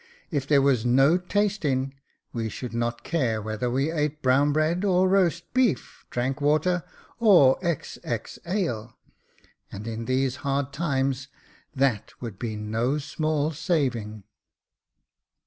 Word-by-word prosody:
If 140 -2 -1
there 140 -2 +4
was 130 -5 +3
no 135 +6 +5
tasting, 180 -9 0 0.4
we 115 -2 -2
should 120 +2 -6
not 120 0 -2
care 125 -10 0
whether 110 +3 -3
we 135 +5 0
ate 150 -1 -2
brown 135 +3 +4
bread 155 +5 +1
or 185 -2 +3
roast 175 -3 +1
beef, 240 - 0
drank 130 +4 -2
water 155 +4 +2 0.4
or 180 - +6
XX 150 - -4
ale 125 - -2 0.5
j - - -28 0.2
and 100 +2 -7
in 115 0 -4
these 130 +1 0
hard 140 0 -2
times, 135 -4 -1 0.5
that 130 -6 0
would 115 -6 -7
be 115 -3 -3
no 110 +6 -1
small 155 +1 -1
saving." 125 - -1
135 Hz, 130 wpm, -26 LUFS, 120-160 Hz, 0.5 s, or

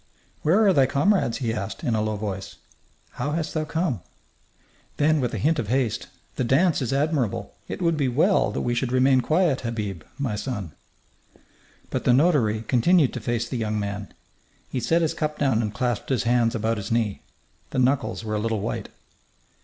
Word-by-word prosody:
"Where 195 +8 +4
are 195 - +5
thy 135 -4 +4
comrades?" 140 - +2
he 115 -5 -1
asked, 105 -3 -5
in 120 - 0
a 110 - +1
low 110 0 -1
voice. 100 -2 -5 0.6
"How 145 - -3
hast 160 0 -2
thou 155 -1 -1
come?" 155 - -1 1.0
Then, 150 0 +3
with 125 - -1
a - - -2
hint 155 +1 +1
of 110 - -2
haste: 120 -2 0 0.3
"The - - +1
dance 145 +7 +3
is 125 - -1
admirable. 140 -5 0
It - - -4
would 165 -2 +2
be 140 -3 +1
well 65 - +3
that 70 - -3
we 120 - 0
should 120 +1 -1
remain 130 0 +4
quiet, 155 +1 +2
Habib, 105 -7 -4 0.2
my 135 -7 -2
son." 105 - -4 1.2
But - - -2
the 125 - +5
notary 125 -7 +3
continued 135 +6 +3
to 125 - -4
face 120 +1 -2
the 125 - -3
young 110 -2 -1
man. 100 0 -4 0.6
He 130 - -1
set 165 +6 +2
his 160 0 +1
cup 155 -2 -2
down 130 -6 +2
and 105 -2 -2
clasped 120 0 -2
his 130 -5 +1
hands 120 0 +2
about 115 0 0
his 100 0 -5
knee. 115 -3 0 0.5
The - - -5
knuckles 125 -4 +1
were 110 - -3
a 105 - 0
little 110 0 -1
white. 115 - -3
125 Hz, 190 wpm, -24 LUFS, 110-150 Hz, 1.2 s, are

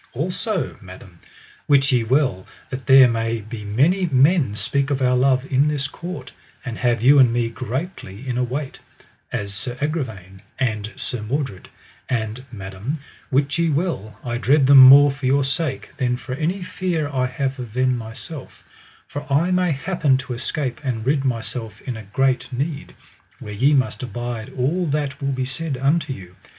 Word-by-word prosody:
Also, 180 - -2
madam, 90 -2 -13 0.5
wit 140 0 +4
ye 125 -3 +3
well 125 -6 +1 0.2
that 130 0 -6
there 135 -1 +8 0.3
be 110 +1 -8
many 150 - +2
men 140 - +3
speak 140 +5 -1
of 140 -2 0
our 125 -1 +3
love 130 +1 +3
in 135 +2 +4
this 145 -2 -1
court, 155 -3 -8 0.3
and 120 -3 -5
have 120 -2 +1
you 140 +3 +7
and 125 -3 +6
me 120 -1 0
greatly 130 - -6
in 125 - -2
await, 130 +3 -3 0.5
as 100 -1 -3
Sir 120 +5 -5
Agravaine 110 - -4 0.2
and 110 -4 -1
Sir 125 - -3
Mordred; 115 -3 -3 0.4
and 115 0 -2
madam, 100 +6 -5 0.3
wit 140 +2 +1
ye 170 -1 +2
well 140 - -2
I 120 -1 -3
dread 135 +5 +4
them 140 0 +8
more 140 +2 +9
for 135 -1 -4
your 140 +2 +3
sake 135 0 -2
than 125 -1 0
for 125 - -7
any 170 +7 -2
fear 180 -5 -2
I 130 -3 0
have 135 +1 -3
of 120 -4 -7
them 130 0 +2
myself, 125 +5 -9 0.4
for 145 0 -7
I 165 +6 +3
may 180 -1 +2
happen 150 -2 +1
to 130 -1 -5
escape 130 +1 -3
and 120 -5 -2
rid 140 +1 +2
myself 115 -3 -3
in 125 - -5
a 110 - -7
great 135 +3 +1
need, 140 +4 -4 0.4
where 110 -5 -8
ye 135 +8 +3
must 130 -2 0
abide 120 -1 -5
all 165 +8 0
that 145 -1 -2
will 140 0 0
be 130 -1 -1
said 135 +2 -3
unto 145 +3 +1
you. 90 -7 -9
130 Hz, 170 wpm, -22 LUFS, 120-145 Hz, 0.5 s, more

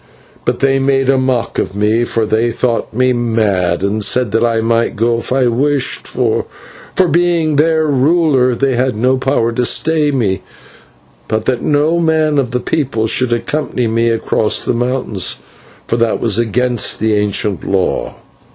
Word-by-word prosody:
But - - -1
they 135 0 +2
made 135 0 +2
a 135 - +2
mock 130 -2 -1
of 95 - -3
me, 105 +3 +1
for 115 -1 -1
they 110 +2 +1
thought 115 0 -1
me 130 +3 +1
mad, 105 -7 0
and 105 +2 -1
said 110 +3 +1
that 115 - +1
I 115 -1 +1
might 115 +1 0
go 115 +1 +1
if - - -8
I 130 0 +2
wished, 135 +3 -1
for - - -1 0.6
being 165 -2 +1
their 160 +1 +2
ruler 140 -3 +2
they 135 +2 0
had 125 -1 0
no 130 +4 +1
power 130 -3 0
to 125 +2 -1
stay 155 +4 +1
me, 110 -9 -1 0.9
but 110 0 -2
that 125 -2 0
no 150 +3 +1
man 155 -3 +1
of 130 -3 -1
the 125 +1 -2
people 125 -4 -1
should 120 +2 +1
accompany 125 +1 -1
me 115 +1 +1
across 110 -1 +1
the - - -1
mountains, 120 -5 -2 0.5
for 115 - -1
that 115 -1 0
was 115 -2 +1
against 120 +1 0
the 110 0 +1
ancient 105 -1 -1
law. 95 -2 -1
120 Hz, 170 wpm, -15 LUFS, 110-135 Hz, 0.9 s, they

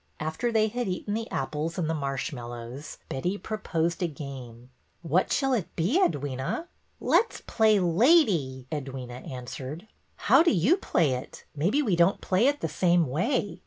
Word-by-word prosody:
After 160 +10 -2
they 220 -1 +3
had 245 +2 -3
eaten 190 +2 -3
the 225 +1 -3
apples 150 +5 -3
and 170 -4 0
the 160 - 0
marsh 135 -3 -3
mallows, 120 +2 -7
Betty 180 +9 -2
proposed 170 -7 -2
a 175 - +2
game. 130 -5 -9 0.3
What 170 +3 +1
shall 270 -1 +2
it 185 -8 -2
be, 195 - +2
Edwyna? 145 - -1 0.2
'' - - -42
Let 465 - +4
's - - -9
play 220 -2 +3
lady,'' 175 - +3
Edwyna 130 -4 -6
answered. 130 - -7 0.2
'' - - -42
How - - +7
do 340 - +4
you 210 - +4
play 165 - +1
it? 125 0 -5
Maybe 200 - +1
we 205 -9 +2
don't 170 +3 +3
play 195 +7 +2
it 290 +1 +1
the - - 0
same 175 -2 +2
way." 185 - -1
170 Hz, 175 wpm, -27 LUFS, 135-215 Hz, 0.3 s, How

